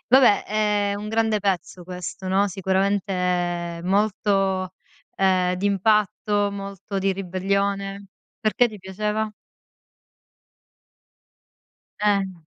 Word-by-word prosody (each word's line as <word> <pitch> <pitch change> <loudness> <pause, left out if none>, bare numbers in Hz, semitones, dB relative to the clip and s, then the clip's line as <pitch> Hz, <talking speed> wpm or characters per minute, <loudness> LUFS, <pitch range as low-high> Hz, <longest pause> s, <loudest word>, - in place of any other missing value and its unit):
Vabbè 250 -5 +6
è 210 -1 +1
un 210 +1 -6
grande 220 -1 +1
pezzo 185 -2 -2
questo, 180 +1 -6
no, 195 +2 +3
sicuramente 180 -3 0
molto, 195 -1 +1 0.4
ehm, 185 -1 +2
d'impatto, 205 +1 +1
molto 195 0 -5
di 195 0 +1
ribellione. 195 +1 -2 0.3
Perché 235 +2 +2
ti 215 - -10
piaceva? 210 +3 -2 2.7
Eh. 200 -2 +2
195 Hz, 85 wpm, -23 LUFS, 185-210 Hz, 2.7 s, Vabbè